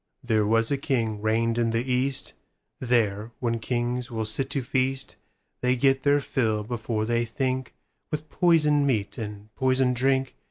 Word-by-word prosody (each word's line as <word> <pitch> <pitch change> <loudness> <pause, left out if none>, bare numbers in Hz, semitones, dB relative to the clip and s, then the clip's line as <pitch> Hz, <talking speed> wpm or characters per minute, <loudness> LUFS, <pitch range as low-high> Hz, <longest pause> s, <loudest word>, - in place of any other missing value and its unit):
There 110 -4 +2
was 115 +2 +2
a 140 - +1
king 115 -7 -1
reigned 115 +2 +1
in 115 -1 +2
the 115 +1 0
East:There, 120 -4 -2
when 115 -2 -1
kings 120 +2 -2
will 110 -2 -3
sit 110 +5 -1
to 135 -2 -2
feast, 130 +1 -1 0.5
They 125 0 +2
get 135 +1 +3
their 145 +1 +3
fill 110 -6 0
before 110 -1 -2
they 120 +1 +1
thinkWith 130 +5 -5
poisoned 150 -5 +3
meat 110 -2 -1
and 105 -1 -7
poisoned 130 -1 +2
drink. 130 +1 +1
120 Hz, 150 wpm, -26 LUFS, 115-135 Hz, 0.5 s, get